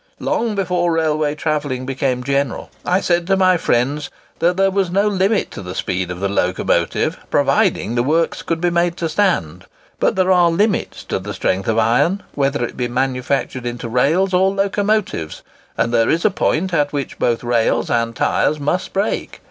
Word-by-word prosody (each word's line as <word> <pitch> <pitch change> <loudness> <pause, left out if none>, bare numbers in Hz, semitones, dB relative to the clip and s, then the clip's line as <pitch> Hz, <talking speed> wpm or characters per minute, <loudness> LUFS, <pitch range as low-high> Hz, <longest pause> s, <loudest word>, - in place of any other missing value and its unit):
Long 225 -2 -1
before 180 -3 0
railway 155 -2 0
travelling 145 -5 -2
became 130 -1 -1
general, 140 -1 -1
I 185 +2 +1
said 175 -1 +1
to 195 0 +3
my 185 -1 +4
friends 145 -1 0 0.3
that 175 +2 +2
there 195 0 +3
was 190 -2 0
no 200 +4 +2
limit 200 +1 +1
to - - -7
the 90 -1 -7
speed 90 -1 -2
of 90 -1 -5
the 100 - 0
locomotive, 90 -2 0
provided 115 - +1
the 120 - +2
works 160 +6 0
could 165 -1 -2
be 175 +1 +1
made 170 0 +1
to 165 - -1
stand. 165 - 0 0.3
But - - +2
there 185 0 +2
are 175 -2 +5
limits 200 +5 0
to - - -3
the - - -6
strength 95 +1 -1
of 110 - +1
iron, 120 - +2
whether 140 -3 0
it - - -8
be 125 -1 -2
manufactured 130 0 -1
into 120 0 -5
rails 155 +11 +2
or 190 +1 +4
locomotives; 200 - -1 0.3
and 115 - 0
there 115 -1 +3
is 165 +4 +1
a 215 - +4
point 180 +1 0
at 145 -3 +1
which 140 -2 -4
both 120 0 0
rails 120 -2 +1
and 115 -1 0
tyres 150 - +1
must 150 +6 -2
break. 200 +2 -2
155 Hz, 185 wpm, -19 LUFS, 120-185 Hz, 0.3 s, are